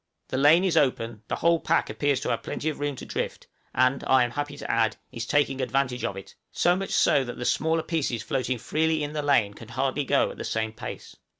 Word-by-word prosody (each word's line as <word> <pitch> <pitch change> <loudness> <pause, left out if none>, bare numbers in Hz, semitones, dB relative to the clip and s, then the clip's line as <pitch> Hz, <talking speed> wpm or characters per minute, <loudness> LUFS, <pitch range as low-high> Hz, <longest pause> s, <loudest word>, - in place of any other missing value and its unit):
The 130 - -2
lane 155 +6 +6
is 185 -3 +1
open; 115 -6 +1
the - - -1
whole 170 0 +3
pack - - +1
appears 145 -3 0
to - - -2
have - - 0
plenty 155 - -3
of 155 - -5
room 145 -1 -2
to - - -8
drift, - - -4 0.3
and, 130 +1 +2
I 130 -1 +5
am 120 - -2
happy 145 +1 -4
to 140 0 -4
add, 115 -1 +1
is 115 +1 -5
taking 140 -2 +1
advantage 130 -1 0
of 100 - -2
it, 95 - -10 0.2
so 175 0 +3
much 195 +1 -3
so 140 - +3
that 120 -1 -7
the 125 - -4
smaller 160 +4 +1
pieces 140 -9 -1
floating 130 -3 -1
freely 155 +5 0
in 145 0 -4
the 150 - -1
lane 140 -8 +2
can 110 +2 -12
hardly 130 +4 -1
go - - +2
at - - -11
the - - -3
same 110 0 -2
pace. - - -8
135 Hz, 235 wpm, -26 LUFS, 120-150 Hz, 0.3 s, lane